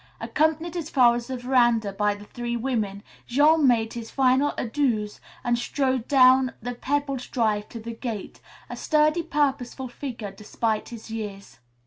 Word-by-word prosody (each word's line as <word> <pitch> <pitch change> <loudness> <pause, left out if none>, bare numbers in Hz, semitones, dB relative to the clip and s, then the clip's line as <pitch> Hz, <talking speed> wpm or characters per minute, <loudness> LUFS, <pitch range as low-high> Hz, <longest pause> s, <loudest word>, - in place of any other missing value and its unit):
Accompanied 315 +2 0
as 330 -3 -4
far 245 -3 +5
as 240 0 -4
the 260 - -4
veranda 240 -4 +2
by 205 +1 +1
the 205 0 -12
three 240 +2 -4
women, 220 -5 -2 0.2
Jean 295 +3 +4
made 225 -2 +2
his 230 -1 -6
final 265 +2 +3
adieus 230 -4 -1 0.2
and 240 -1 +1
strode 260 -2 -1
down 260 -2 +5
the 245 +2 -4
pebbled 275 +1 -2
drive 215 -3 0
to 230 - -8
the 230 +1 -6
gate, 225 -3 -6 0.3
a - - -6
sturdy, 305 +2 +2
purposeful 275 -4 -1
figure, 240 -6 -6
despite 215 +2 -2
his 230 -1 -10
years. 205 - -7
245 Hz, 155 wpm, -25 LUFS, 225-275 Hz, 0.3 s, far